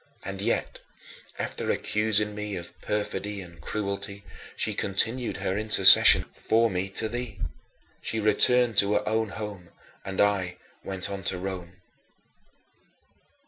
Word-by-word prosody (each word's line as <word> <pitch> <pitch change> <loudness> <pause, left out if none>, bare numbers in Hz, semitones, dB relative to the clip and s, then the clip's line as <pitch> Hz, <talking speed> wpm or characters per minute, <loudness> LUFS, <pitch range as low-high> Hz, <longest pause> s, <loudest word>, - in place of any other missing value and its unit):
And - - -6
yet, - - -2 0.6
after - - -5
accusing 105 -1 +1
me 105 -1 -5
of 85 -1 -9
perfidy 105 -1 -4
and 85 -2 -13
cruelty, 100 -1 -5 0.3
she - - 0
still - - -4
continued 115 +5 0
her 95 -1 -3
intercessions 100 -3 +7
for 115 +1 0
me 95 +1 -3
to 110 +3 +2
thee. 115 -3 -6 0.6
She 110 - -3
returned 115 +2 +3
to 100 +1 +5
her 105 0 -1
own 110 0 -1
home, 100 -4 -8 0.3
and 95 -1 -7
I 95 -3 0 0.3
went 95 0 -2
on 100 -1 -6
to 95 - +2
Rome. 90 -1 -7
100 Hz, 135 wpm, -25 LUFS, 95-110 Hz, 0.6 s, intercessions